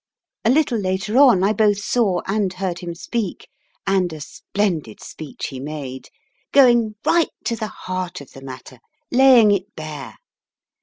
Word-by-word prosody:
A - - +3
little 260 -4 +2
later 190 +3 -2
on 245 -10 +6
I 205 +2 +3
both 210 -1 +3
saw 205 -3 +1
and 195 -1 0
heard 185 -2 -3
him 170 -1 -6
speak 210 +2 -4 0.4
and 190 -3 +1
a 155 - -7
splendid 165 - -3
speech 155 -3 -7
he 135 - -7
made, 135 -2 -6 0.4
going 240 -5 +5
right 340 -1 +3
to 230 - -1
the 220 -1 -4
heart 185 -2 -5
of 140 - -13
the 135 - -12
matter, 130 -1 -10 0.3
laying 250 -4 +6
it 200 +1 -2
bare. 150 -7 -7
190 Hz, 155 wpm, -21 LUFS, 155-220 Hz, 0.4 s, on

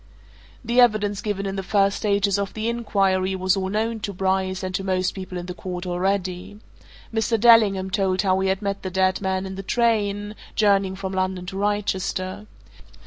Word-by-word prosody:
The 240 +2 +4
evidence 210 -4 +2
given 205 -3 -2
in 195 0 -3
the - - -1
first 195 +1 +2
stages 200 -1 +1
of 200 -1 -3
the 220 +1 -2
inquiry 195 -5 +1
was 185 +1 +1
all 190 -1 -2
known 220 +2 -1
to 205 - -4
Bryce, 190 0 -1
and 185 0 -3
to 195 - -2
most 185 -1 0
people 185 -1 -7
in 175 - -5
the 180 - -5
court, 180 0 -6
already. 185 +2 -2 0.5
Mr. 225 0 +1
Dellingham 205 -5 +5
told 190 0 +1
how 190 -1 +2
he 190 0 +1
had 190 +2 -1
met 200 0 -2
the 190 - -4
dead 185 +1 +1
man 190 0 -1
in 190 - -6
the 190 - -5
train, 205 -2 0 0.2
journeying 200 -3 +2
from 190 0 -5
London 185 -1 -1
to 185 - -7
Wrychester. 195 -1 -2
195 Hz, 190 wpm, -23 LUFS, 185-205 Hz, 0.5 s, Dellingham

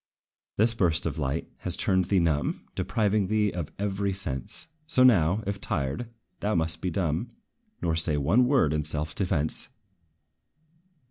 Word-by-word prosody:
This 115 +2 +3
burst 85 -7 +1
of - - -3
light 70 +2 -2
has - - +1
turned 95 -1 +2
thee 95 +2 +1
numb, 80 -4 0
Depriving 105 -2 0
thee 105 0 +1
of 85 -4 -5
every 100 -1 -1
sense; 75 -9 -4 0.2
So 140 -6 +4
now, 100 -4 +4
if 100 0 -4
tried, 70 - -2 0.3
thou 105 0 -1
must 80 -1 -1
be 90 - -1
dumb, 85 +4 -1 0.5
Nor 80 -1 +1
say 80 -2 +1
one 95 - +3
word 125 - +3
in 75 0 0
self 75 +1 +2
defence! 80 -5 +1
90 Hz, 150 wpm, -27 LUFS, 80-105 Hz, 0.5 s, So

